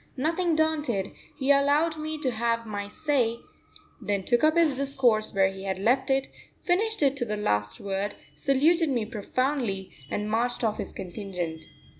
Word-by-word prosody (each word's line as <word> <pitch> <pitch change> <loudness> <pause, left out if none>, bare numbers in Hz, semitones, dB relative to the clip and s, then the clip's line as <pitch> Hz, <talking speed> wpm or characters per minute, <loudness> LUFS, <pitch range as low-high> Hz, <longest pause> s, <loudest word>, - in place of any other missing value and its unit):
Nothing 330 +4 +1
daunted, 300 -11 0 0.3
he 270 +1 +2
allowed 290 +3 +3
me 310 0 -4
to 260 - 0
have 230 0 -1
my 205 -2 -4
say, 260 -3 0 0.6
then 200 -2 -1
took 240 +6 +2
up 310 +1 +5
his 330 -4 +5
discourse 260 -5 +2
where 195 -1 +3
he 195 0 -8
had 190 -1 -1
left 245 +8 +2
it, 270 0 +2 0.3
finished 425 +1 +1
it 275 -1 +3
to 260 - 0
the 210 -1 -3
last 105 - -1
word, 200 +1 -3 0.2
saluted 315 +4 +3
me 240 -5 0
profoundly, 225 -2 -2 0.2
and 210 0 -2
marched 240 +3 0
off 215 -2 0
his - - -4
contingent. 175 -4 -5
245 Hz, 165 wpm, -27 LUFS, 205-290 Hz, 0.6 s, up